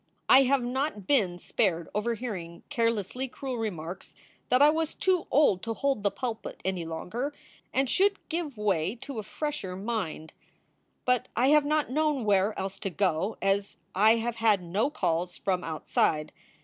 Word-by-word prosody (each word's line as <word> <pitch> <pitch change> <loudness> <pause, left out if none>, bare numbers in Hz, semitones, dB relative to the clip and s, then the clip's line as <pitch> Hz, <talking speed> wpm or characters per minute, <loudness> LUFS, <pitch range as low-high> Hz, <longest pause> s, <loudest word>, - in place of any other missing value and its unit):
I 270 +1 +7
have 270 0 +2
not 250 -4 -2
been 190 -8 +2
spared 175 -2 0
overhearing 210 -6 -3
carelessly 230 -1 0
cruel 255 -1 -5
remarks 180 -5 -5 0.3
that 250 - +4
I 290 +2 +7
was 320 0 -1
too 370 -3 +1
old 265 -10 +4
to 225 +2 -3
hold 275 -4 0
the 200 - +2
pulpit 235 0 -5
any 185 -3 -1
longer 235 - -4 0.4
and 270 0 +1
should 400 +8 +3
give 320 -7 -3
way 195 -2 0
to 250 0 -7
a - - -1
fresher 215 -4 -4
mind; 190 -6 -4 0.7
but 250 -1 +2
I 250 +4 +3
have 300 0 +5
not 300 -2 +1
known 300 -4 +1
where 205 +1 +2
else 195 0 -4
to 195 - -2
go, 185 +2 0
as 195 +1 +1 0.2
I 215 +4 +5
have 235 0 -2
had 215 -5 +3
no 195 +10 0
calls 175 - -1
from 185 -2 -1
outside. 155 -1 0
220 Hz, 160 wpm, -28 LUFS, 190-270 Hz, 0.7 s, I